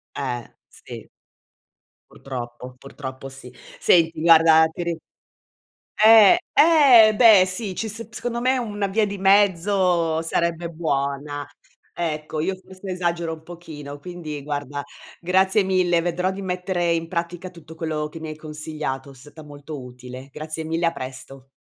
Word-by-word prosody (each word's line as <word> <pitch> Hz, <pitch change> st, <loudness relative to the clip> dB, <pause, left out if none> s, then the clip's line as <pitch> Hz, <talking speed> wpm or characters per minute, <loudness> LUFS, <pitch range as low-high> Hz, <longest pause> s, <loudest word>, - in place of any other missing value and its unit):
Eh, 125 Hz, -4 st, -4 dB, 0.2 s
sì. -, -, -11 dB, 1.0 s
Purtroppo, 125 Hz, -1 st, -8 dB
purtroppo 135 Hz, 0 st, -9 dB
sì. 135 Hz, 0 st, -12 dB, 0.3 s
Senti 165 Hz, -, +3 dB
guarda 160 Hz, 0 st, +6 dB
ti 175 Hz, +2 st, -6 dB
ri 170 Hz, -1 st, -3 dB, 1.1 s
eh, 225 Hz, -, +8 dB, 0.2 s
eh 270 Hz, -9 st, +6 dB
beh 215 Hz, -5 st, +7 dB
sì, 190 Hz, +1 st, -3 dB
ci 220 Hz, -, -3 dB
s 225 Hz, +2 st, -5 dB
secondo 235 Hz, +2 st, -4 dB
me 255 Hz, +1 st, +2 dB
una 205 Hz, -3 st, -3 dB
via 210 Hz, +2 st, +1 dB
di 200 Hz, 0 st, -5 dB
mezzo 185 Hz, -4 st, +2 dB
sarebbe 170 Hz, 0 st, -2 dB
buona. 145 Hz, -2 st, -3 dB, 0.5 s
Ecco, 155 Hz, -2 st, -4 dB
io 185 Hz, +5 st, -1 dB
forse 190 Hz, +1 st, -10 dB
esagero 170 Hz, -2 st, -2 dB
un 160 Hz, -, -11 dB
pochino, 155 Hz, -4 st, -10 dB
quindi 155 Hz, -4 st, -7 dB
guarda, 145 Hz, -1 st, -4 dB, 0.4 s
grazie 190 Hz, +3 st, +2 dB
mille, 185 Hz, -2 st, +2 dB
vedrò 180 Hz, +2 st, -1 dB
di 195 Hz, -, -7 dB
mettere 180 Hz, -2 st, -1 dB
in 165 Hz, 0 st, -2 dB
pratica 175 Hz, +1 st, -4 dB
tutto 165 Hz, -3 st, -14 dB
quello 155 Hz, -2 st, -3 dB
che 160 Hz, +2 st, -11 dB
mi 160 Hz, 0 st, -7 dB
hai 155 Hz, -, -6 dB
consigliato, 150 Hz, -3 st, -6 dB
seta 145 Hz, +4 st, -14 dB
molto 145 Hz, -1 st, -9 dB
utile. 125 Hz, +1 st, -11 dB
Grazie 155 Hz, +1 st, -6 dB
mille, 165 Hz, +2 st, -1 dB
a 165 Hz, -, +2 dB
presto. 130 Hz, +1 st, -9 dB
165 Hz, 140 wpm, -22 LUFS, 145-185 Hz, 1.1 s, eh